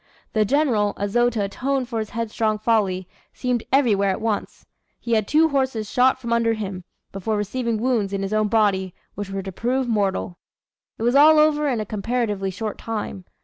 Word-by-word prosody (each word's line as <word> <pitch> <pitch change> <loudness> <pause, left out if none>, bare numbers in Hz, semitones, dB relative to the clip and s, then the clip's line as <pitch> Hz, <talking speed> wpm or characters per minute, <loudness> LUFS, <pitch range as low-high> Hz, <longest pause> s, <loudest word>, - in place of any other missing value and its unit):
The 215 -1 +3
general, 235 -6 +1
as 200 0 -3
though 240 0 +4
to 220 -4 -2
atone 260 +6 -1
for 235 -2 -4
his 215 -1 -4
headstrong 220 -1 -1
folly, 205 -5 0 0.3
seemed 250 -2 -1
everywhere 215 -8 +3
at 190 - -1
once. 220 -2 -3 0.3
He 235 - -6
had 215 -3 +2
two 320 +2 +4
horses 260 -6 -1
shot 255 +1 +3
from 235 -2 -2
under 230 -1 +2
him, 195 -5 -5 0.3
before 205 +3 -2
receiving 230 +2 -2
wounds 225 -5 0
in 195 0 -2
his 195 +2 -3
own 215 0 +2
body, 200 -4 +1 0.2
which 205 0 -6
were 195 0 -4
to 190 - -6
prove 250 +6 -1
mortal. 195 -5 -1 0.6
It - - -5
was 240 +1 +2
all 305 +3 +7
over 300 -1 +3
in 250 -5 0
a 215 - -2
comparatively 210 -2 -2
short 215 +3 -5
time. 210 -4 -5
220 Hz, 190 wpm, -22 LUFS, 200-245 Hz, 0.6 s, all